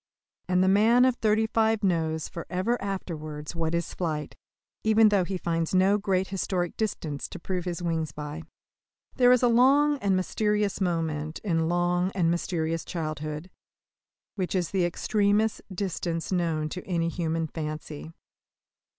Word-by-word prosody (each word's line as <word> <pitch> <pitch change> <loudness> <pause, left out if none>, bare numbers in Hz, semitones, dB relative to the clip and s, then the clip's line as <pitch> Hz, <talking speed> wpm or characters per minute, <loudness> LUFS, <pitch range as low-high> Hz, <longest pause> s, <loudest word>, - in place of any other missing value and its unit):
And 180 0 +3
the - - +3
man 225 +6 +5
of 255 -1 +2
thirty 220 0 +2
five 220 -1 +1
knows 160 -4 0
for 170 - -8
ever 190 +7 0
afterwards 155 -6 -5
what 165 0 -1
is 170 -1 -2
flight, 155 -4 -3 0.5
even 220 0 +5
though 200 -3 +3
he 190 +1 -3
finds 165 0 -1
no 195 +3 +4
great 190 -2 0
historic 185 -2 -2
distances 160 -9 -3
to - - -7
prove 180 0 -3
his 175 -1 -3
wings 160 -3 -1
by. 150 +2 -6 0.8
There 245 -1 +6
is 250 0 +4
a - - +6
long 275 +5 +4
and 200 -4 +1
mysterious 210 +2 0
moment 160 -3 -1
in 165 -5 +1
long 175 +1 +1
and 170 -3 +2
mysterious 165 -2 -1
childhood, 155 +1 -5 0.8
which 185 -1 -2
is 180 -3 0
the 185 -3 +2
extremest 205 +4 +1
distance 175 -3 -3
known 165 -4 0
to 180 +3 -6
any 170 -2 0
human 165 -1 -1
fancy. 150 - -6
180 Hz, 150 wpm, -27 LUFS, 165-200 Hz, 0.8 s, There